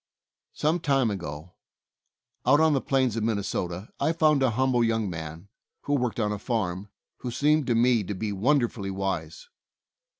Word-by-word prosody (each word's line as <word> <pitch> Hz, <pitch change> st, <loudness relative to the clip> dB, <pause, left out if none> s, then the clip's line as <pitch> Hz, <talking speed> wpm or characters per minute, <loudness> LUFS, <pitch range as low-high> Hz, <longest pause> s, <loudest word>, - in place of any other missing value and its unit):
Some 155 Hz, +4 st, +1 dB
time 135 Hz, -7 st, +2 dB
ago, 85 Hz, -2 st, -6 dB, 0.9 s
out 140 Hz, +4 st, +5 dB
on 160 Hz, -1 st, +4 dB
the 135 Hz, -, +1 dB
plains 130 Hz, -4 st, +1 dB
of 115 Hz, -, -1 dB
Min 110 Hz, -1 st, +1 dB
nesota, 95 Hz, -1 st, -3 dB
I 160 Hz, -, +1 dB
found 155 Hz, -3 st, +3 dB
a 130 Hz, -, +4 dB
humble 125 Hz, +1 st, +2 dB
young 115 Hz, -2 st, +1 dB
man, 80 Hz, +2 st, -7 dB, 0.3 s
who 145 Hz, -, -2 dB
worked 125 Hz, -4 st, 0 dB
on 105 Hz, -2 st, +1 dB
a 105 Hz, -, -3 dB
farm, 105 Hz, -4 st, -2 dB, 0.3 s
who 125 Hz, -, -5 dB
seemed 150 Hz, +4 st, +2 dB
to 120 Hz, -, +2 dB
me 120 Hz, -1 st, +3 dB
to 105 Hz, -, -4 dB
be 105 Hz, +2 st, -3 dB
wonderfully 115 Hz, -1 st, +1 dB
wise. 95 Hz, -, -4 dB
115 Hz, 170 wpm, -26 LUFS, 100-135 Hz, 0.9 s, out